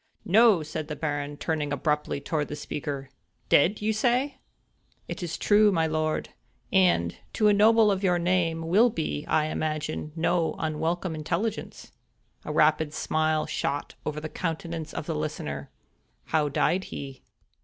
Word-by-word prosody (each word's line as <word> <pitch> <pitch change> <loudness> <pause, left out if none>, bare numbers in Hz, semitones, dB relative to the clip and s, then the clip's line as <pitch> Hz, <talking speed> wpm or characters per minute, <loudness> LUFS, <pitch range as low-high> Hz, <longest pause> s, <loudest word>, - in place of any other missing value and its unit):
"No!" 210 -3 +5
said 155 0 -5
the 150 - -4
Baron, 145 -2 -3
turning 150 -2 -2
abruptly 150 0 -1
toward 150 +1 -2
the 150 - -5
speaker, 140 -2 -5 0.4
"dead! 185 +9 +4
say 220 +4 +2
you?" 285 - -7 0.8
"It - - -6
is 170 -2 -3
indeed - - -7
true, 210 0 +6
my 165 -4 +2
lord; 155 0 -1 0.4
and, 175 - +3 0.2
to 215 -1 +3
a - - +5
noble 215 +1 +5
of 195 -1 -1
your 180 -2 +3
name, 170 -2 0
will 215 +8 +5
be, 160 -6 -3
I 155 - +2
imagine, 155 0 -3
no 165 0 +1
unwelcome 165 +3 -2
intelligence." 175 +8 -3 0.5
A - - -3
rapid 155 0 +2
smile 155 0 0
shot 145 +1 -3
over 150 0 -3
the 155 - -5
countenance 165 -1 -4
of - - -5
the 165 - -2
listener. 75 - -4 0.6
"How 150 -2 +1
died 150 +6 +1
he?" 135 -1 -8
160 Hz, 155 wpm, -27 LUFS, 150-185 Hz, 0.8 s, true